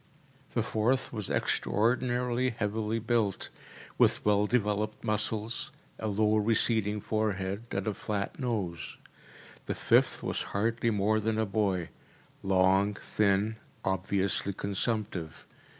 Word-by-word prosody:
The - - +2
fourth 125 +5 0
was 105 -4 -2
extraordinarily 125 +3 +1
heavily 110 -1 -1
built, 115 -3 0 0.5
with - - +3
well 105 0 +3
developed 105 -2 0
muscles, 110 +5 -1 0.3
a 110 - -2
low 105 +1 +2
receding 110 -1 +2
forehead 100 -1 -1
and 95 0 -2
a 105 - 0
flat 105 - -3
nose. 100 - -3 0.7
The - - -1
fifth - - +3
was - - -1 0.2
hardly 115 +3 +1
more 110 0 +2
than 110 +1 0
a 110 - +2
boy, 100 -4 0 0.5
long, 95 +2 +3
thin, 105 +1 +1 0.3
obviously 95 +1 0
consumptive. 100 -4 -3
105 Hz, 115 wpm, -30 LUFS, 100-115 Hz, 0.7 s, with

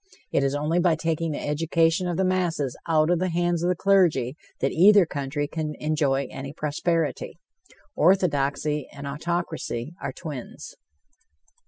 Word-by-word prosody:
It 140 - +2
is 135 +1 0
only 155 +4 0
by 175 -2 +3
taking 165 0 -1
the 150 - -4
education 165 +3 +1
of 175 -2 -2
the 190 - +2
masses 170 -8 0
out 160 0 +3
of 175 - +2
the 185 +1 0
hands 175 0 0
of 175 - +1
the 180 - +2
clergy 170 -10 +2 0.2
that 135 - 0
either 200 +2 +6
country 145 -1 -3
can 155 -1 -4
enjoy 145 -3 0
any 135 +1 -7
prosperity. 155 +1 -2 0.6
Orthodoxy 150 -4 +1
and 140 0 -9
autocracy 160 -3 -3
are - - -3
twins. 145 -7 -8
160 Hz, 150 wpm, -25 LUFS, 145-175 Hz, 0.6 s, either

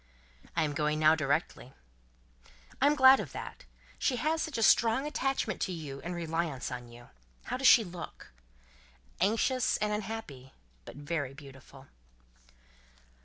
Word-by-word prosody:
"I 165 - +2
am 150 -1 -2
going 150 +1 0
now, 155 0 +5
directly." 150 -3 -2 1.1
"I 280 - +5
am 295 - +3
glad 265 -1 +7
of - - -6
that. - - -8 0.3
She 260 - +1
has 310 +6 0
such 315 -6 -3
a 225 - 0
strong 230 +5 +4
attachment 270 -8 -2
to - - -1
you 150 -5 -7
and 175 +1 -5
reliance 165 -5 -3
on 125 -1 -7
you. 120 +1 -15 0.3
How - - -4
does 265 0 +3
she 235 - +8
look?" 175 -3 -10 0.9
"Anxious 225 +6 +1
and 210 0 -1
unhappy, 205 -12 -6 0.3
but - - -10
very 145 -2 -4
beautiful." 135 -1 -14
170 Hz, 145 wpm, -30 LUFS, 145-230 Hz, 1.1 s, she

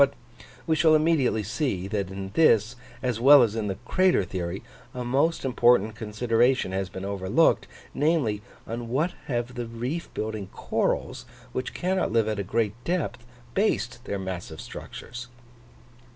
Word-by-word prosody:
But 140 0 +4 0.5
we 160 - +2
shall 155 0 +5
immediately 155 -8 +2
see, 110 - -2
that 100 -2 -2
in 95 0 -6
this, 115 -7 +4 0.3
as 125 -3 0
well 135 +2 +8
as 110 -2 0
in 110 -2 -1
the 95 - -2
crater 185 - +3
theory, 90 +1 -4 0.3
a 125 -1 -4
most 140 +6 +1
important 120 -4 +4
consideration 115 +1 +1
has 95 -1 -2
been 95 +2 -6
overlooked, 95 -2 +2 0.3
namely, 140 -8 +1 0.2
on 115 0 -5
what 150 +9 +1 0.2
have 120 -1 -2
the 120 -1 -4
reef 125 +9 -4
building 110 -2 -3
corals, - - -2 0.3
which 130 0 -4
cannot 185 +1 0
live 115 -1 +2
at 110 -2 -1
a - - -1
great 105 +2 0
depth, 170 -8 -2 0.3
based 160 - 0
their 100 - -2
massive 90 -4 -6
structures? 120 0 -8
120 Hz, 150 wpm, -26 LUFS, 100-135 Hz, 0.5 s, well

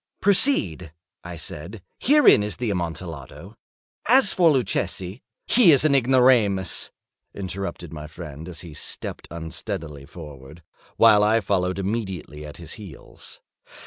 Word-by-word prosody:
"Proceed," 145 - +2 0.3
I 85 0 -8
said; 85 +6 -8 0.2
"herein 290 - +5
is 105 0 -3
the 120 -3 -2
Amontillado. 85 -6 -6 0.5
As 250 -2 +5
for 175 -3 +4
Luchesi—" 115 - -1 0.2
"He 225 -8 +6
is 145 +1 +4
an 150 - +3
ignoramus," 125 - +3 0.5
interrupted 95 -3 -6
my 75 -1 -8
friend, 75 0 -9
as 85 -3 -8
he 85 -3 -11
stepped 75 - -7
unsteadily 80 -3 -6
forward, 75 -1 -12 0.3
while 110 -2 +6
I 110 +2 +3
followed 95 -3 -1
immediately 95 -7 -4
at 75 - -11
his 85 -2 -9
heels. 90 -9 -11
95 Hz, 125 wpm, -23 LUFS, 80-115 Hz, 0.5 s, He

